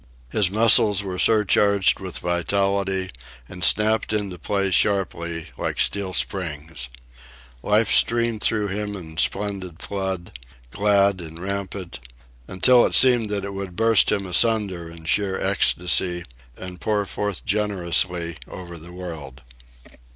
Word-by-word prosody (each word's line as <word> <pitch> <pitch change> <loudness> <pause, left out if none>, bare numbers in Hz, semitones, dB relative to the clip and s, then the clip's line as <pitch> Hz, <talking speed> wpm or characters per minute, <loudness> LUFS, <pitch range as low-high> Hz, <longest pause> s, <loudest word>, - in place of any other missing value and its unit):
His 100 -4 +2
muscles 105 -1 +5
were 90 -2 -5
surcharged 100 -2 +3
with 95 -3 -5
vitality, 95 +2 -1 0.4
and 90 0 -8
snapped 110 +5 +2
into 100 -4 -3
play 100 +3 -2
sharply, 85 -5 0
like - - -4
steel 100 -2 0
springs. 80 -8 -3 0.7
Life 105 - +1
streamed 115 -2 +2
through 105 -2 +2
him 105 +1 -4
in 80 -4 -10
splendid 95 -3 -1
flood, 95 -3 -5 0.4
glad 100 -1 +1
and 80 -1 -10
rampant, 95 -2 -6 0.5
until 120 +6 +4
it - - 0
seemed 120 -4 +5
that 100 -1 -2
it 100 - -7
would 95 -2 -7
burst 115 +1 +3
him 100 -2 -1
asunder 95 -3 +1
in 85 -1 -13
sheer 95 +2 0
ecstasy 90 0 0 0.3
and 90 -2 -10
pour 105 +3 -1
forth 105 -1 -5
generously 90 -4 -1
over 85 -2 -10
the 85 +3 -13
world. 80 -7 -9
95 Hz, 130 wpm, -22 LUFS, 90-105 Hz, 0.7 s, muscles